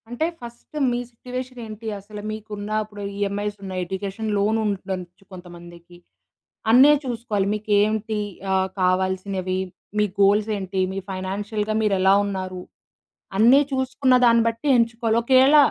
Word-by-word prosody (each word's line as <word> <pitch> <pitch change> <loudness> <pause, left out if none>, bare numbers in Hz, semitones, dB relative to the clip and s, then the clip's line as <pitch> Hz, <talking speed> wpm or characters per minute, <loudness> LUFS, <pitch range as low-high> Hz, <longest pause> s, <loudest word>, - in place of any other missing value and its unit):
అంటే 245 +6 -1 0.2
ఫస్ట్ 240 +5 -12 0.2
మీ 240 - -1
సిట్యుయేషన్ 250 +1 -7
ఏంటి, 220 +1 -8
అసల 210 +1 -10
మీకు 215 0 -8
ఉన్నా‌ 205 +1 -4
అప్పుడు 205 -1 -11 0.2
ఈఎంఐస్ 205 +1 -2
ఉన్నయి, 185 -1 -4
ఎడ్యుకేషన్ 195 +4 -4
లోన్ 210 +2 +2
ఉండచ్చు 185 -3 -4
కొంతమందికి. 175 -1 -12 0.7
అన్నీ 260 +5 +8
చూసుకోవాలి 230 -5 -2
మీకేమిటి 215 +1 +1 0.3
ఆహ్, 190 0 +1
కావాల్సినవి, 185 0 0 0.4
మీ 210 - +4 0.2
గోల్స్ 205 +2 +4
ఏంటి? 190 -1 -2
మీ 195 - -3
ఫైనాన్షియల్‌‌గా 205 +3 -3
మీరు 210 -2 +2
ఎలా 190 +1 +5
ఉన్నారు? 185 -2 -4 0.8
అన్నీ 240 +7 +6
చూసుకున్న 260 0 +1
దాన్ని 230 -1 +5
బట్టి 230 +6 -3
ఎంచుకోవాలి. 230 -1 +1
ఒకయేళ 265 +4 +6
210 Hz, 130 wpm, -23 LUFS, 190-230 Hz, 0.8 s, అన్నీ